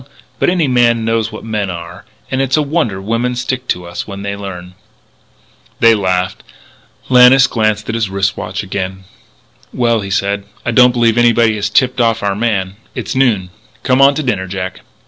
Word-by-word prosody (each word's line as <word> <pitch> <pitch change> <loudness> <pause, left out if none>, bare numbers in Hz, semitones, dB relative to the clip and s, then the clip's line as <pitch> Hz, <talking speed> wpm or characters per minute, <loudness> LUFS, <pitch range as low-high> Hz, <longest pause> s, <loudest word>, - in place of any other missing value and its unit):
But - - +2
any 175 -4 +1
man 120 -3 +2
knows 115 -1 0
what 110 - -9
men 105 -3 -2
are. 85 +1 -8 0.3
And 130 0 0
it's 135 +2 +1
a 155 - +2
wonder 140 - -1
women 115 +5 -1
stick 125 +1 -3
to 90 0 -2
us 85 0 -6
when 100 -1 -7
they 100 0 -3
learn." 90 -3 -8 1.1
They 115 0 +6
laughed. 95 -3 -1 0.7
Lannis 130 +1 +7
glanced 110 -4 -1
at 110 - -3
his 110 -3 -1 0.3
watch - - -5
again. 95 -1 -5 0.7
"Well," 115 -3 +1
he 100 - -6
said, 100 +1 -1 0.2
"I 120 - 0
don't 125 +1 +6
believe 120 -1 +2
anybody 115 -1 +4
has 105 0 -2
tipped 125 +3 +2
off 115 -1 +1
our 100 -1 0
man. 100 -3 -1 0.2
It's - - -4
noon. 110 -9 +1 0.3
Come 130 +1 +2
on 140 +1 +6
to 155 - -2
dinner, 100 -8 -1
Jack." 95 0 -5
110 Hz, 180 wpm, -15 LUFS, 100-125 Hz, 1.1 s, Lannis